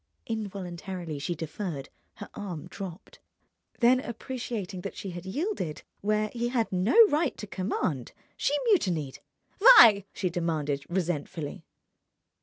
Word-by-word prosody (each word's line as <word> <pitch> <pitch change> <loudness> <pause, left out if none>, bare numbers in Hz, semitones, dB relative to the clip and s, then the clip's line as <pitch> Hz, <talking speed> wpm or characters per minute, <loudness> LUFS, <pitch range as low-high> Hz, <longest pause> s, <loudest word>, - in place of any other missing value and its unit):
Involuntarily 185 -6 -5
she 175 +5 -2
deferred, 160 -2 -5 0.3
her 205 - -8
arm 180 -7 -6
dropped. 190 -1 -9 0.6
Then, 250 +2 +6
appreciating 230 -6 -5
that - - -6
she 195 - -5
had 175 +1 -8
yielded 200 - -3 0.2
where 215 +1 0
he 240 0 -1
had 240 -3 0
no 185 - +1
right 300 -1 +1
to - - -6
command, 185 - -2 0.2
she 290 - +1
mutinied. 175 - +1 0.4
"Why?" 235 - +9
she 185 -3 -2
demanded, 155 -5 -1
resentfully. 170 -4 -3
190 Hz, 120 wpm, -28 LUFS, 170-225 Hz, 0.6 s, Why